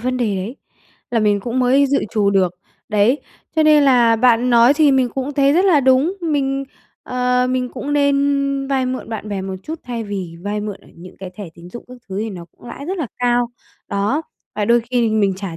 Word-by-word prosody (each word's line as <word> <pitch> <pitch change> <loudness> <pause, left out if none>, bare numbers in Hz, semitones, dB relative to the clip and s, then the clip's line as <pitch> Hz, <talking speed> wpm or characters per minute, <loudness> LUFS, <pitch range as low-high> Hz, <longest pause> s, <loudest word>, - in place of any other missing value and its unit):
vấn 255 +2 -1
đề 220 -6 0
đấy, 205 +8 -5 0.5
là 235 - +1
mình 205 -1 +2
cũng 240 +5 -3
mới 260 +3 +4
dự 280 +1 +1
trù 205 -2 +1
được, 190 -3 +2 0.4
đấy. 215 +6 +2 0.4
Cho 315 - +4
nên 305 -1 +5
là 240 -4 +4
bạn 245 +1 +3
nói 240 +3 +6
thì 295 -2 +4
mình 260 -2 +2
cũng 270 +2 -3
thấy 280 0 +3
rất 355 +5 +3
là 345 -7 +4
đúng, 265 +7 +3
mình 275 -4 -1 0.4
ờ, 250 0 0
mình 255 -1 -1
cũng 285 +3 -5
nên 280 -1 +1
vay 265 -2 +1
mượn 255 -2 -4
bạn 220 -2 -6
bè 200 -2 -3
một 190 0 -5
chút 320 +1 -6
thay 235 -2 -4
vì 190 -5 -5
vay 205 +1 -3
mượn 210 -2 -5
ở - - -20
những 180 +2 -13
cái 190 -1 -7
thẻ 205 - -6
tín 170 +1 -13
dụng 240 - -9
các 250 - -10
thứ 190 0 -4
thì 220 +1 -3
nó 180 -4 -8
cũng - - -15
lãi 280 - -8
rất 380 - -3
là 310 - -2
cao. 245 0 +2 0.4
Đó, 210 +11 -1 0.3
và 210 - -1
đôi 235 +3 +4
khi 235 - -17
thì 230 - +2
mình 200 -3 +1
trả 190 -4 -6
245 Hz, 230 wpm, -19 LUFS, 210-275 Hz, 0.5 s, nói